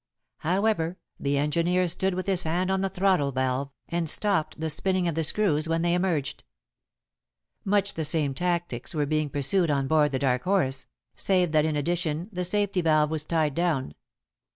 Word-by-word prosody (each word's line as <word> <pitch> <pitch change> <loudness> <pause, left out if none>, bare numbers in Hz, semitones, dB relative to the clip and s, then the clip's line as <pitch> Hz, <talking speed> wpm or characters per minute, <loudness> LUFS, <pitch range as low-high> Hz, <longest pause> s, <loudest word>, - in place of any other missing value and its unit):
However, 185 -1 0 0.2
the 140 0 0
engineer 170 +5 +1
stood 190 +2 +1
with 185 - -3
his 190 -3 +2
hand 180 +4 0
on 190 0 +1
the 195 - 0
throttle 185 -7 +1
valve, 130 +1 -1 0.2
and 170 -2 -1
stopped 195 -5 0
the 160 0 -1
spinning 185 +3 0
of 170 - 0
the 160 +1 -1
screws 160 -3 +1
when 165 0 0
they 170 0 +2
emerged. 175 -6 -1 1.2
Much 200 0 +1
the 160 - -3
same 150 -2 0
tactics 170 -5 -2
were 150 -1 +1
being 155 0 0
pursued 145 +6 +1
on 140 -2 +1
board 150 0 +3
The 135 - 0
Dark 125 -2 +1
Horse, 135 -9 0 0.3
save 180 -4 +2
that 155 -1 +3
in 155 -1 0
addition 165 +3 -1
the 180 - -2
safety 200 0 0
valve 155 -2 +3
was 155 -1 -1
tied 155 -3 0
down. 155 - -1
165 Hz, 175 wpm, -26 LUFS, 150-185 Hz, 1.2 s, board